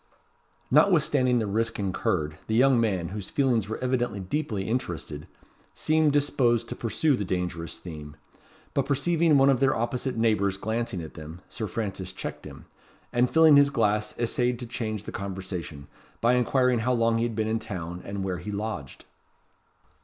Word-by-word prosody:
Notwithstanding 150 -9 +4
the 110 - 0
risk 115 +3 -1
incurred, 90 -6 -1
the 110 - 0
young 130 0 +5
man, 95 -7 0
whose 100 0 -6
feelings 120 -7 +1
were 110 - -3
evidently 120 -5 0
deeply 105 -1 -2
interested, 85 - -3 0.5
seemed 155 -1 +2
disposed 130 -5 +2
to - - -4
pursue 130 +6 +1
the 105 - -3
dangerous 90 -3 -3
theme; 75 -4 -9 0.6
but 140 -1 0
perceiving 160 +2 +3
one 135 0 +6
of 130 - +1
their 135 -1 +3
opposite 125 +2 -2
neighbours 105 -4 +2
glancing 110 -4 -2
at 80 - -9
them, 80 +2 -10
Sir 110 - -4
Francis 95 -4 -4
checked - - -6
him; - - -11 0.5
and 120 +1 +3
filling 160 -2 +7
his 140 0 +6
glass 105 -4 0
essayed 120 +1 0
to 120 - -6
change 110 -3 -4
the - - -7
conversation, 95 -6 -6 0.3
by 120 +2 +3
inquiring 125 0 +2
how 125 +3 +1
long 115 -1 +2
he - - +1
had 120 -2 -2
been 110 0 0
in 110 +1 0
town, 90 -4 -6
and 100 -1 -4
where 90 -2 -2
he 90 +7 -6
lodged? 100 -9 -5
115 Hz, 170 wpm, -26 LUFS, 95-125 Hz, 0.6 s, filling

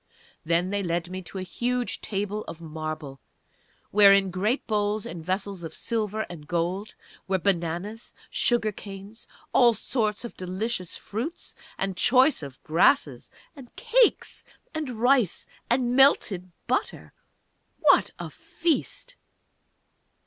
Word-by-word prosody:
Then 170 +3 +1
they 205 0 0
led 175 -1 -2
me 185 0 -4
to 185 +2 -9
a 185 - -3
huge 245 +6 -2
table 205 +1 -3
of 165 - -8
marble, 155 -3 -6 0.7
where 200 -1 +8
in 195 -1 +4
great 210 +9 0
bowls 210 -1 0
and 165 -1 -7
vessels 190 +1 -3
of 165 - -7
silver 220 -2 -2
and 155 -4 -10
gold 180 +5 -2 0.3
were 190 0 +2
bananas, 185 +4 -1 0.2
sugar 235 -3 +2
canes, 200 +2 -10 0.3
all 240 -3 +6
sorts 215 -2 -1
of 235 - -8
delicious 185 0 -3
fruits, 245 - -6 0.2
and 195 -1 -2
choice 260 - +4 0.2
grasses 175 - +2 0.3
and 260 -4 -13
cakes - - +2 0.3
and 310 -3 -3
rice 245 -3 +2 0.2
and 245 0 +2
melted 200 -9 +4
butter.... 255 - -2 0.7
_What - - +5
a - - -6
feast! 345 +9 -2
205 Hz, 125 wpm, -26 LUFS, 180-240 Hz, 0.7 s, where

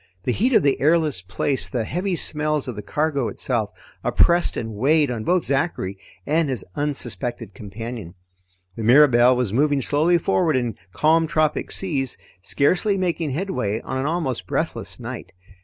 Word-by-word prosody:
The 125 - 0
heat 245 - +1
of - - +5
the 140 -1 +1
airless 155 - +3
place, 95 +9 -2
the 120 -3 -1
heavy 180 - -2
smells 150 -3 0
of 125 - -4
the 105 - -5
cargo 140 +2 -1
itself, 115 -5 -1 0.3
oppressed 175 0 +3
and 115 -1 -4
weighed 145 +5 +2
on 115 -3 -4
both 180 +7 +1
Zachary 135 - -1 0.3
and 155 0 +1
his 125 -7 -3
unsuspected 120 -6 -3
companion. 105 -2 -8 0.6
The 115 - -5
Mirabelle 125 0 +6
was 125 -5 -1
moving 145 +3 +2
slowly 160 +6 +3
forward 170 -3 +1
in 120 -4 -1 0.2
calm 160 - +3
tropic 155 -1 0
seas, 140 -9 -1 0.2
scarcely 180 - +2
making 170 -6 -1
headway 140 - -2
on 130 - -4
an 135 - -1
almost 135 - -2
breathless - - -3
night. - - -7
140 Hz, 155 wpm, -22 LUFS, 120-160 Hz, 0.6 s, Mirabelle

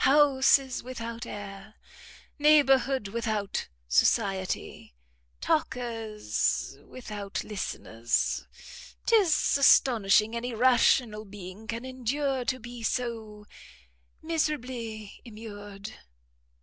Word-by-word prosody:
Houses 270 -2 +4
without 235 -2 -6
air! 205 +1 -8 0.6
Neighbourhood 270 -6 +4
without 215 -2 -2 0.2
society! 190 - 0 0.5
Talkers 235 -9 -1
without 210 -5 -6
listeners! 120 - -2 0.6
'Tis 395 -12 +3
astonishing 225 -5 +5
any 235 0 -3
rational 240 -2 +3
being 200 +1 -10
can 230 +2 -4
endure 260 +1 -1
to 260 +1 0
be 240 +1 -9
so 225 -3 -3 0.8
miserably 250 -10 -3
immured." 205 -2 -9
230 Hz, 75 wpm, -28 LUFS, 210-260 Hz, 0.8 s, astonishing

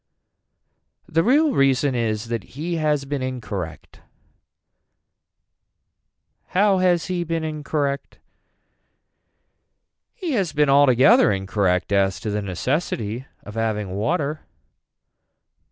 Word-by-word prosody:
The 165 - +2
real 290 +6 +4
reason 135 0 +2
is 115 -2 -2
that 115 +2 -5
he 170 +3 -2
has 150 -3 0
been 140 -1 -3
incorrect. 105 -10 -6 2.6
How 200 -1 +4
has 180 -2 +2
he 180 -2 -2
been 165 -1 -2
incorrect. 145 -2 -3 2.0
He 355 -4 -4
has 195 - 0
been 150 -1 +2
altogether 140 - +5
incorrect 95 -1 0
as 95 -2 +2
to 105 - -3
the 105 0 -1
necessity 115 - -2 0.2
of 105 - -10
having 105 -3 -2
water. 145 - -2
135 Hz, 100 wpm, -22 LUFS, 105-160 Hz, 2.6 s, altogether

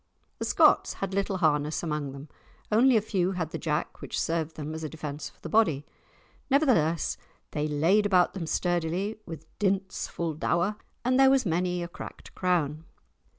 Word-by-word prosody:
The - - -2
Scots - - +4
had 195 -1 -4
little 195 0 0
harness 150 -3 +1
among 150 -4 -2
them, 140 +2 -9 0.4
only 240 +3 +5
a - - +3
few 190 -3 0
had 165 -4 -3
the - - -4
jack 150 -2 -2
which - - -3
served 160 -1 -1
them 155 0 -5
as 160 0 -6
a 155 - -3
defence 150 -1 -6
for - - -27
the - - -6
body. 165 -11 +2 0.6
Nevertheless, 240 - +2 0.3
they 150 0 -1
laid 170 +8 +3
about 180 -3 +3
them 175 -5 -4
sturdily, 175 +5 -1
with 160 -2 -8
"dints 195 -1 0
full 170 -2 -3
dour," 175 +6 0 0.3
and 255 +1 +3
there 270 0 +7
was 265 -2 +3
many 180 0 0
a - - -4
cracked 175 - -10
crown. 165 -4 0
170 Hz, 175 wpm, -28 LUFS, 155-195 Hz, 0.6 s, there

